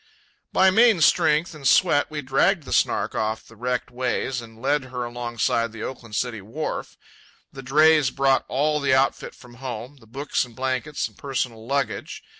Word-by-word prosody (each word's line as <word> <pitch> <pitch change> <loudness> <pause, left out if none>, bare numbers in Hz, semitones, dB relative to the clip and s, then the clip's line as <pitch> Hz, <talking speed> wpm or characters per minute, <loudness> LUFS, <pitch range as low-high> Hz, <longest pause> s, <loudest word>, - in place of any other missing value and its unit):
By 190 0 +5
main 225 -1 +5
strength 155 +2 +3
and 145 -3 -3
sweat 145 -3 +4
we 150 -1 -5
dragged 145 +7 +2
the - - -5
Snark - - +1
off 110 0 -2
from - - -17
the 115 - -20
wrecked 125 0 -2
ways 125 0 -2
and 115 -1 -13
laid 140 +2 0
her 125 -1 -5
alongside 120 -1 -1
the 110 0 -8
Oakland 115 -4 -7
City 115 -3 -2
Wharf. 120 +11 -5 0.6
The 135 - -8
drays 150 +1 +4
brought 135 0 +2
all 150 +3 +1
the 135 -2 +2
outfit 135 +1 0
from 120 -1 -16
home, 125 +2 -6
the 115 -4 -20
books 140 +6 -1
and 120 -2 -12
blankets 130 +3 -2
and - - -20
personal 125 -5 -4
luggage. 135 -4 -2
130 Hz, 180 wpm, -24 LUFS, 120-145 Hz, 0.6 s, By